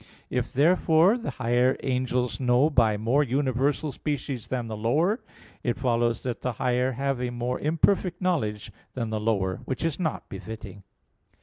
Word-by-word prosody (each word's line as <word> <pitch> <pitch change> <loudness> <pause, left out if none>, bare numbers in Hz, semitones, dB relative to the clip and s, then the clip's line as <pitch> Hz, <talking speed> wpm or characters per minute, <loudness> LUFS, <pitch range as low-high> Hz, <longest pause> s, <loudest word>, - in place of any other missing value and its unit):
If, - - -1
therefore, 165 - +4
the 230 - -4
higher 125 +1 +1
angels 125 -1 0
know 130 +4 +3
by 115 -6 +3
more 115 +7 +2
universal 140 +2 0
species 135 -3 -4
than 125 -2 -2
the 110 - -4
lower, 155 - +1 0.4
it 120 - -1
follows 120 -2 +1
that 125 -2 -3
the 125 - -1
higher 125 +2 0
have 135 0 -1
a 125 - -1
more 120 +1 -2
imperfect 175 +3 +1
knowledge 110 - -1 0.2
than 115 -3 -3
the 110 - -1
lower; 100 -4 0
which 130 +5 -3
is 165 0 -1
not 160 -4 -2
befitting. 100 0 -8
125 Hz, 160 wpm, -26 LUFS, 115-145 Hz, 0.4 s, therefore